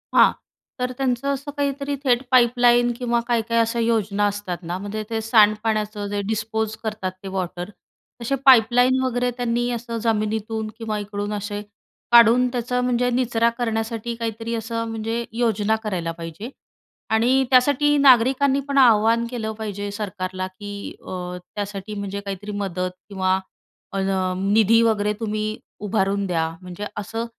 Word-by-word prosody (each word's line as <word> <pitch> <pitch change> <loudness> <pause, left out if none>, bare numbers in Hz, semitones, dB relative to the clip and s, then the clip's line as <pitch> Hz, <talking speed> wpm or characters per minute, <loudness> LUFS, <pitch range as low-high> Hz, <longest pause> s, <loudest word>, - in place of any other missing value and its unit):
हां, - - +7 0.5
तर 250 0 -1
त्यांचं 260 -1 -1
असं 280 +2 -5
काहीतरी 280 0 -1
थेट 245 -3 +3
पाईपलाईन 240 -1 +4
किंवा 240 -1 0
काय-काय 230 -1 0
अशा 230 +1 +1
योजना 215 -3 +1
असतात 205 -3 -4
ना, 175 +2 -3
म्हणजे 205 +3 -5
ते 225 -1 -1
सांडपाण्याचं 215 -1 +2
जे 205 0 -1
डिस्पोज 220 0 -2
करतात 215 -4 -3
ते - - -6
वॉटर, 185 -1 -4 0.5
तसे 235 +4 0
पाईपलाईन 250 +1 +6
वगैरे 250 -1 0
त्यांनी 240 0 0
असं 235 0 -4
जमिनीतून 220 0 -1
किंवा 220 -2 -3
इकडून 205 0 -4
असे 205 0 -4 0.5
काढून 235 +1 +7
त्याचा 250 0 -1
म्हणजे 250 0 +1
निचरा 235 -2 +2
करण्यासाठी 225 0 -2
काहीतरी 230 0 -4
असं 230 0 -3
म्हणजे 225 +1 -3
योजना 220 -2 +1
करायला 180 -6 -2
पाहिजे 165 +6 -7 0.6
आणि 245 +4 +3
त्यासाठी 285 +3 +4
नागरिकांनी 270 +1 +5
पण 280 - -1
आवाहन 230 -2 +5
केलं 225 -3 -3
पाहिजे 205 -2 -4
सरकारला 185 -3 -4
की 200 +2 -8
अ, 180 -1 -5 0.2
त्यासाठी 205 0 -5
म्हणजे 200 0 -4
काहीतरी 200 +1 -6
मदत 185 -2 -2 0.2
किंवा 190 -1 +1 0.5
अ, - - -4 0.4
निधी 215 +3 +4
वगैरे 210 -2 +2
तुम्ही 215 -1 -2 0.2
उभारून 200 -1 0
द्या. 165 -3 0
म्हणजे 180 +2 -7
असं 225 +3 -3
220 Hz, 140 wpm, -22 LUFS, 205-240 Hz, 0.6 s, हां